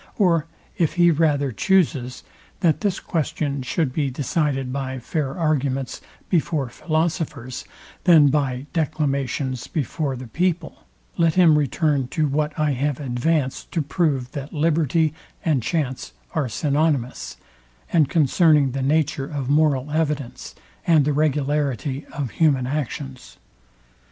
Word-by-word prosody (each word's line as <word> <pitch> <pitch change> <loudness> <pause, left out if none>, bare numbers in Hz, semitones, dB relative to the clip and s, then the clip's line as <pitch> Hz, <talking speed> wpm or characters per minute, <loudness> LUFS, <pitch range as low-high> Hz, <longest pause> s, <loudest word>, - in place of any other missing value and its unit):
Or 170 -6 +3 0.3
if 165 -3 +2
he 175 -1 +5
rather 145 -4 +2
chuses, 140 - +1 0.4
that 165 -5 +2
this 200 -3 0
question 155 -4 -2
should 130 +2 -1
be 145 -2 0
decided 135 -1 -1
by 135 -1 -3
fair 135 +3 -3
arguments 140 -5 -1 0.3
before 155 -6 0
philosophers, 155 -4 -2 0.4
than 160 -6 +7
by 135 -2 0
declamations 140 -5 -1
before 145 -1 -2
the 130 +1 -7
people, 175 +6 -2 0.3
let 165 -2 +3
him 175 -4 +6
return 145 -1 +1
to 155 +3 0
what 150 +2 -1
I 150 -1 +2
have 140 +1 -1
advanced 135 +1 -1
to 165 - 0
prove 140 -4 0
that 140 0 -6
liberty 160 0 +1 0.3
and 150 -6 +2
chance 135 -2 -2 0.2
are 145 -6 0
synonimous; 140 0 -1 0.6
and 155 -5 +4
concerning 150 -2 +4
the 135 +2 -3
nature 145 0 +1
of 140 -3 -3
moral 145 -2 +2
evidence 150 -5 -2 0.3
and 160 -4 +5
the 150 - +1
regularity 145 -2 0
of 140 -5 -4
human 140 -6 +2
actions. 135 -1 -5
145 Hz, 125 wpm, -22 LUFS, 135-160 Hz, 0.6 s, than